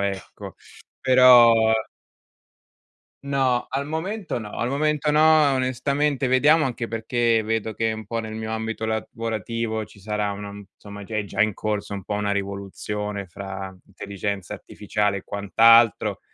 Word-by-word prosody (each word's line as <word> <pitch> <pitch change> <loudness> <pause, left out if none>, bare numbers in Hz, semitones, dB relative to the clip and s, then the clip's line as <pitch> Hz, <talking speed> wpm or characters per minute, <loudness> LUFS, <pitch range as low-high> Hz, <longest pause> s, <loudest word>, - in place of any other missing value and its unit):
ecco. 100 -1 -5 0.5
Però 125 -2 +7 1.7
No, 135 -3 0
al 140 +1 -2
momento 165 - -4
no, 105 -3 -8
al 120 - 0
momento 150 +1 0
no, 155 -2 +5
onestamente. 135 +2 0
Vediamo 150 +5 +4
anche 120 -2 -4
perché 115 0 0
vedo 110 0 -2
che 115 +1 0
un 110 -2 -6
po' 115 +1 -3
nel 110 -1 -7
mio 110 0 -5
ambito 110 0 -4
lavorativo 110 0 -3
ci 105 - -18
sarà, 105 +1 -2
una 100 0 -6
insomma, 100 0 -12
già 110 +2 -6
è 105 - -1
già 100 0 0
in 110 - +1
corso 105 0 -3
un 100 -2 -7
po' 105 - -3
una 105 0 -1
rivoluzione 100 +1 -4
fra 95 +1 -8
intelligenza 100 -1 -5
artificiale 105 -1 -2
e 95 - -6
quant'altro. 115 +3 +4
110 Hz, 145 wpm, -23 LUFS, 100-130 Hz, 1.7 s, Però